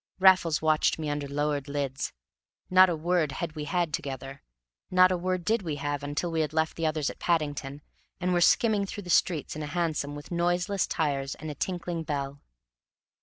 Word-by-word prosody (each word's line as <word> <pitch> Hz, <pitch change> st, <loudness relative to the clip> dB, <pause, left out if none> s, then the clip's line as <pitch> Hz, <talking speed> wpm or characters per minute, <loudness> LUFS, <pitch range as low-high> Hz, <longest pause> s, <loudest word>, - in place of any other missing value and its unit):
Raffles 185 Hz, -5 st, +5 dB
watched 155 Hz, -1 st, +3 dB
me 155 Hz, -2 st, -2 dB
under 145 Hz, -1 st, -3 dB
lowered 145 Hz, 0 st, -1 dB
lids. 140 Hz, -2 st, -2 dB, 0.6 s
Not 185 Hz, 0 st, +7 dB
a 170 Hz, -, 0 dB
word 160 Hz, -2 st, 0 dB
had 170 Hz, +4 st, -3 dB
we 150 Hz, -1 st, -4 dB
had 170 Hz, 0 st, 0 dB
together; 135 Hz, 0 st, -5 dB, 0.5 s
not 185 Hz, 0 st, +6 dB
a -, -, +2 dB
word 180 Hz, 0 st, -2 dB
did 225 Hz, 0 st, +2 dB
we 160 Hz, -5 st, -3 dB
have 145 Hz, 0 st, -3 dB
until 145 Hz, +4 st, -2 dB
we 165 Hz, -1 st, +1 dB
had 155 Hz, 0 st, -2 dB
left 160 Hz, 0 st, 0 dB
the 165 Hz, -1 st, 0 dB
others 155 Hz, -2 st, 0 dB
at -, -, -15 dB
Paddington, 145 Hz, -4 st, -1 dB, 0.4 s
and 180 Hz, 0 st, 0 dB
were 175 Hz, -, +2 dB
skimming 205 Hz, +2 st, +4 dB
through 205 Hz, -, -6 dB
the 175 Hz, -, -4 dB
streets 160 Hz, -3 st, +2 dB
in 155 Hz, -, -5 dB
a 150 Hz, -, -4 dB
hansom 150 Hz, -3 st, -1 dB
with 145 Hz, +3 st, -10 dB
noiseless 175 Hz, +3 st, +1 dB
tires 140 Hz, -3 st, -1 dB
and 155 Hz, 0 st, -6 dB
a -, -, -5 dB
tinkling 175 Hz, +2 st, -3 dB
bell. 140 Hz, -2 st, -4 dB
155 Hz, 195 wpm, -28 LUFS, 145-175 Hz, 0.6 s, Not